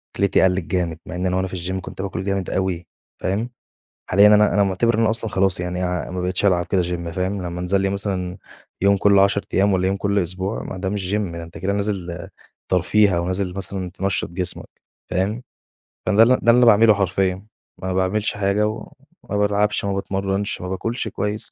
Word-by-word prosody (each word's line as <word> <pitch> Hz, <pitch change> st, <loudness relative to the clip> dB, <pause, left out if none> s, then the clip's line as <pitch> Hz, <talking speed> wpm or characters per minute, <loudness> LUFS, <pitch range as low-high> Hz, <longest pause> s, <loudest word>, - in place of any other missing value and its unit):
أكلتي 100 Hz, -1 st, +2 dB
قلّت 95 Hz, 0 st, +3 dB
جامد، 85 Hz, -3 st, -1 dB
مع -, -, -7 dB
إن 90 Hz, +1 st, -2 dB
أنا 90 Hz, 0 st, 0 dB
وأنا 95 Hz, 0 st, 0 dB
في 95 Hz, -, -7 dB
الGym 95 Hz, +2 st, -3 dB
كنت -, -, -8 dB
بآكل 95 Hz, -2 st, -4 dB
جامد 95 Hz, -2 st, -2 dB
أوي، 90 Hz, -3 st, -2 dB, 0.3 s
فاهم. 105 Hz, +6 st, -1 dB, 0.6 s
حاليًا 100 Hz, +3 st, +6 dB
أنا 105 Hz, 0 st, +5 dB
أنا 100 Hz, -, +4 dB
معتبِر 100 Hz, +5 st, +1 dB
إن 110 Hz, -, +1 dB
أنا 110 Hz, -1 st, +3 dB
أصلًا 115 Hz, -1 st, 0 dB
خلاص 95 Hz, -2 st, +2 dB
يعني، 90 Hz, +1 st, -2 dB
آآ، 90 Hz, -1 st, -2 dB
ما 90 Hz, -, -4 dB
بقيتش 90 Hz, +2 st, -1 dB
ألعب 90 Hz, -3 st, +3 dB
كده 95 Hz, 0 st, +1 dB
Gym 85 Hz, -1 st, -3 dB
فاهم، 95 Hz, +3 st, -2 dB
لمّا 90 Hz, 0 st, -5 dB
أنزل 95 Hz, +2 st, +1 dB
لي 95 Hz, -, +1 dB
مثلًا 95 Hz, -2 st, -3 dB, 0.4 s
يوم 100 Hz, +1 st, +4 dB
كل 100 Hz, 0 st, +4 dB
10 100 Hz, +1 st, +3 dB
أيام 100 Hz, +1 st, +3 dB
والّا 95 Hz, 0 st, +1 dB
يوم 95 Hz, -, +1 dB
كل 100 Hz, +1 st, 0 dB
أسبوع، 95 Hz, +3 st, -2 dB
ما -, -, -6 dB
ده 95 Hz, 0 st, -2 dB
مش 95 Hz, -1 st, -2 dB
Gym -, -, +3 dB, 0.2 s
ده 85 Hz, 0 st, -6 dB
أنت 85 Hz, 0 st, -10 dB
كده 95 Hz, +4 st, -1 dB
نازل 95 Hz, -4 st, -3 dB, 0.4 s
ترفيه 105 Hz, -4 st, +3 dB
أو 85 Hz, 0 st, -1 dB
نازل 95 Hz, 0 st, -2 dB
مثلًا 95 Hz, -1 st, -5 dB
تنشّط 95 Hz, +2 st, -1 dB
جسمك، 90 Hz, 0 st, -2 dB, 0.4 s
فاهم. 100 Hz, +7 st, -1 dB, 0.7 s
فده 110 Hz, +3 st, +6 dB
ال -, -, +5 dB
ده 130 Hz, -, +6 dB
اللي 115 Hz, -, +3 dB
أنا 125 Hz, -, +5 dB
باعمله 115 Hz, -1 st, +6 dB
حرفيًا، 95 Hz, 0 st, 0 dB, 0.4 s
ما 95 Hz, 0 st, -2 dB
باعملش 95 Hz, +3 st, 0 dB
حاجة 105 Hz, +1 st, +1 dB
وما 115 Hz, -, -7 dB
بالعبش، 105 Hz, 0 st, +1 dB
ما 100 Hz, -, 0 dB
باتمرنش، 95 Hz, +1 st, -2 dB
ما 90 Hz, -, -5 dB
باكُلش 115 Hz, +5 st, -2 dB
كويّس 105 Hz, +2 st, -4 dB
95 Hz, 205 wpm, -21 LUFS, 90-105 Hz, 0.7 s, حاليًا